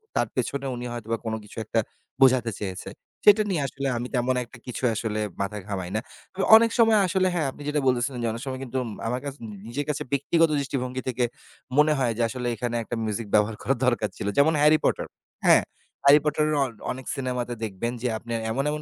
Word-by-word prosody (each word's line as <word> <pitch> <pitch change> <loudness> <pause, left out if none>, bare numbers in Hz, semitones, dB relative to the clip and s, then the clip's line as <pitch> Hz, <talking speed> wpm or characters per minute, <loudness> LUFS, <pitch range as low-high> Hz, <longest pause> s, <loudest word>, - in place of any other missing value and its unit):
তার - - +2
পেছনে 140 0 -2
উনি 120 0 -6
হয়তোবা 115 -1 -3
কোন 110 - -2
কিছু 105 - -15
একটা 115 - 0 0.4
বোঝাতে 130 -3 +5
চেয়েছে, 95 -3 -5 0.4
সেটা 210 +1 +8
নিয়ে 175 -6 0
আসলে 140 +1 -4
আমি 120 +1 -3
তেমন 125 +1 +1
একটা 120 +1 -14
কিছু 125 - -5
আসলে 110 -1 -2 0.2
মাথা 100 +2 -2
ঘামাই 95 -3 -3
না। 110 - 0 0.3
তবে 195 0 -2
অনেক 230 +1 +6
সময় 225 -2 +6
আসলে 185 +1 +2
হ্যাঁ, 160 -5 0
আপনি 145 - -14
যেটা 150 - +1
বলতেছিলেন, 125 0 +1
যে - - +1
অনেক 115 +1 -6
সময় 130 -1 -4
কিন্তু 130 0 -4
উম 115 - -6 0.2
আমার 125 +2 -1
কাছ 140 - -3 0.3
নিজের 140 +5 -3
কাছে 145 - -1
ব্যক্তিগত 165 +4 +3
দৃষ্টিভঙ্গি 130 -2 -3
থেকে 125 -1 0 0.5
মনে 150 +1 +5
হয় 125 -4 +1
যে, - - 0
আসলে 125 -1 -4
এখানে 120 +2 -3
একটা 120 - -4
মিউজিক 110 0 -3
ব্যবহার 105 +1 +3
করা 135 - +1
দরকার 120 -4 +1
ছিল - - -4
যেমন 155 +3 +5
'হ্যারি 150 +1 +6
পটার' - - 0 0.4
হ্যাঁ। - - +7 0.4
হ্যারিপটারের 150 +1 +4
অ - - +1 0.3
অনেক 130 0 -7
সিনেমাতে 125 -3 -2
দেখবেন 110 +2 -2
যে 125 - 0
আপনার 115 +1 -4
এমন 135 +4 0
এমন 150 0 -3
125 Hz, 205 wpm, -25 LUFS, 115-145 Hz, 0.5 s, সেটা